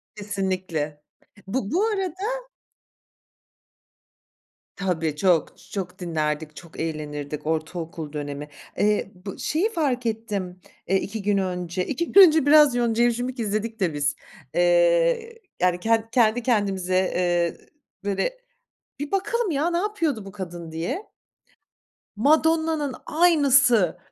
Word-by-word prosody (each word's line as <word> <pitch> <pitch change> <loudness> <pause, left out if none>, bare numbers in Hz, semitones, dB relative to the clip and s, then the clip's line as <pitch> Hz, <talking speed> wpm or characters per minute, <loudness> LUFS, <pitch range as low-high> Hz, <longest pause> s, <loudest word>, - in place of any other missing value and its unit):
Kesinlikle. 185 -7 -3 0.5
Bu 210 0 -2
bu 390 +6 +2
arada 425 +5 -3 2.3
Tabii 165 -6 -1
çok, 170 0 +1
çok 185 -1 -5
dinlerdik, 155 -3 -2
çok 170 0 -12
eğlenirdik 150 -2 -4
ortaokul 160 -1 -3
dönemi. 145 0 -5 0.3
Eee, 210 -1 +1
bu 195 - -6
şeyi 345 +9 0
fark 265 -7 0
ettim, 210 -5 -3 0.3
eee, 195 - +3
2 215 +2 -5
gün 205 0 +1
önce, 180 -1 -2
2 335 +5 -2
gün 395 - +9
önce, 315 -3 +2
biraz 295 -3 +6
Yonca 235 -1 +2
Evcimik 245 +2 0
izledik 220 +1 -2
de 180 -5 +1
biz. 145 -1 0 0.4
Eee, - - +3 0.2
yani 180 -1 +2
ken 225 +2 +1
kendi 235 -1 +3
kendimize, 195 -6 0 0.2
eee, 175 -1 +1 0.5
böyle 200 - -1 0.6
"Bir 290 +1 -5
bakalım 415 +3 0
ya 310 +3 +1
ne 340 - 0
yapıyordu 335 - -1
bu 195 - -10
kadın." 175 -4 -7
diye. 175 - -4 1.1
Madonna'nın 315 +2 +2
aynısı. 280 - +4
210 Hz, 115 wpm, -24 LUFS, -, 2.3 s, gün